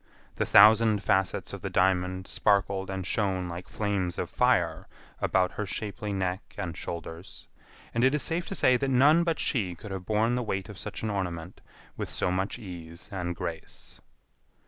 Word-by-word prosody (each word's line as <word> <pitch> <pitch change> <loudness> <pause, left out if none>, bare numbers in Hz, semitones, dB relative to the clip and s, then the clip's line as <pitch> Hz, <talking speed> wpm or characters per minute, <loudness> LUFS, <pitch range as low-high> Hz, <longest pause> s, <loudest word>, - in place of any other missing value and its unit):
The - - 0
thousand 110 -1 +6
facets 95 0 +1
of - - -6
the - - -3
diamond 95 0 +1
sparkled 100 -2 +1
and 95 -1 -4
shone 95 -3 0
like 85 +1 -7
flames 100 -4 -1
of - - -3
fire - - +2 0.3
about 90 -1 +2
her 105 - -4
shapely 105 +1 -4
neck 95 -1 -3
and 90 -5 -4
shoulders, 85 +2 -7 0.5
and 115 - +1
it 130 +3 +4
is 150 - +1
safe 170 +1 0
to 195 - -3
say 125 -7 +4
that 135 +1 -1
none 145 +6 +5
but 165 -2 0
she 95 -9 0
could 105 +4 -10
have 95 -2 -6
borne 110 +2 +2
the 125 - 0
weight 95 -3 -3
of 100 - -9
such - - -6
an 110 - -1
ornament 90 -3 -4 0.4
with - - -4
so 90 - 0
much 95 +2 -1
ease 85 -4 -9
and 90 -2 -3
grace. 80 -1 -7
95 Hz, 180 wpm, -28 LUFS, 90-110 Hz, 0.5 s, thousand